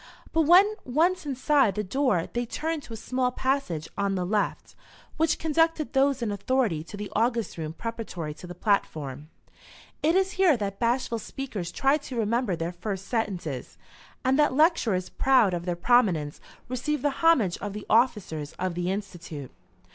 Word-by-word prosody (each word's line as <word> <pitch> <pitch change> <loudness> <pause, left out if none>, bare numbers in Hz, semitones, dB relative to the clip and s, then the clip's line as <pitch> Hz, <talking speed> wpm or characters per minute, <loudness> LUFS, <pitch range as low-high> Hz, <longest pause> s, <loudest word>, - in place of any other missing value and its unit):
But 325 -2 +3
when 385 +5 +7
once 330 +6 +1
inside 270 -4 +2
the 210 - -1
door 210 -4 +1
they 240 0 -1
turned 320 +5 -3
to 235 - -10
a - - -5
small 255 +3 0
passage 250 - -1
on 200 -1 0
the 180 -1 -1
left, 205 +2 -1 0.4
which 320 -1 +2
conducted 325 0 +1
those 270 -2 +2
in 215 - -1
authority 205 -5 0
to 205 - -9
the 205 0 -6
august 230 0 0
room 160 -2 -5
preparatory 195 -7 -5
to 180 - -11
the 175 - -8
platform. 155 - -1 0.7
It 320 +4 +3
is 385 0 +2
here 365 -8 +4
that 200 -2 -4
bashful 235 -1 0
speakers 215 -8 -5
try 275 +2 +2
to 275 -3 -8
remember 230 -2 +1
their 165 +1 -3
first 195 +1 -5
sentences, 180 - -3 0.5
and 265 +3 +3
that 295 -3 +3
lecturers, 260 - +2
proud 255 -8 +3
of 175 0 -3
their 175 - 0
prominence, 175 -8 +2 0.3
receive 255 +3 -2
the 290 - +2
homage 265 - +4
of 205 0 -5
the 210 0 -7
officers 210 - +1
of 185 -1 -3
the 175 +1 -2
Institute. 175 -8 -6
230 Hz, 170 wpm, -27 LUFS, 180-275 Hz, 0.7 s, when